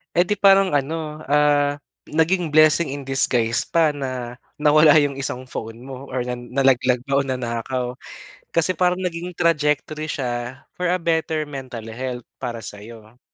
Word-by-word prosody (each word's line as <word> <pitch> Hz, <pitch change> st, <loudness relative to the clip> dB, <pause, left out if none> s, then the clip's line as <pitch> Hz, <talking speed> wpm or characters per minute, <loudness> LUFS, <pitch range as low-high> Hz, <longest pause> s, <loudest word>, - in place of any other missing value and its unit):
Eh, 175 Hz, -, +5 dB
'di 205 Hz, +3 st, -1 dB
parang 195 Hz, -1 st, +5 dB
ano, 150 Hz, +2 st, -2 dB
ah, 145 Hz, 0 st, +3 dB, 0.3 s
naging 165 Hz, +3 st, +1 dB
blessing 155 Hz, +1 st, +5 dB
in 140 Hz, -, -7 dB
disguise 120 Hz, -4 st, +1 dB
pa 165 Hz, -2 st, +3 dB
na 130 Hz, -4 st, -5 dB, 0.2 s
nawala 150 Hz, +1 st, +5 dB
'yong 145 Hz, -3 st, +2 dB
isang 130 Hz, -1 st, -3 dB
phone 115 Hz, -2 st, -7 dB
mo 135 Hz, +1 st, -9 dB
or 130 Hz, -1 st, -2 dB
na 125 Hz, 0 st, -4 dB
nalaglag 125 Hz, -1 st, +1 dB
ba 140 Hz, +1 st, +1 dB
o -, -, +1 dB
nanakaw. 125 Hz, 0 st, -3 dB, 0.6 s
Kasi 165 Hz, +2 st, +2 dB
parang 180 Hz, 0 st, +2 dB
naging 175 Hz, 0 st, -4 dB
trajectory 155 Hz, -2 st, 0 dB
siya, 125 Hz, -3 st, -4 dB, 0.2 s
for 180 Hz, -, 0 dB
a 180 Hz, -, +2 dB
better 160 Hz, -1 st, 0 dB
mental 135 Hz, -5 st, -7 dB
health 125 Hz, +1 st, -5 dB, 0.2 s
para 120 Hz, -3 st, -5 dB
sa'yo. 110 Hz, +3 st, -10 dB
140 Hz, 155 wpm, -22 LUFS, 125-155 Hz, 0.6 s, Eh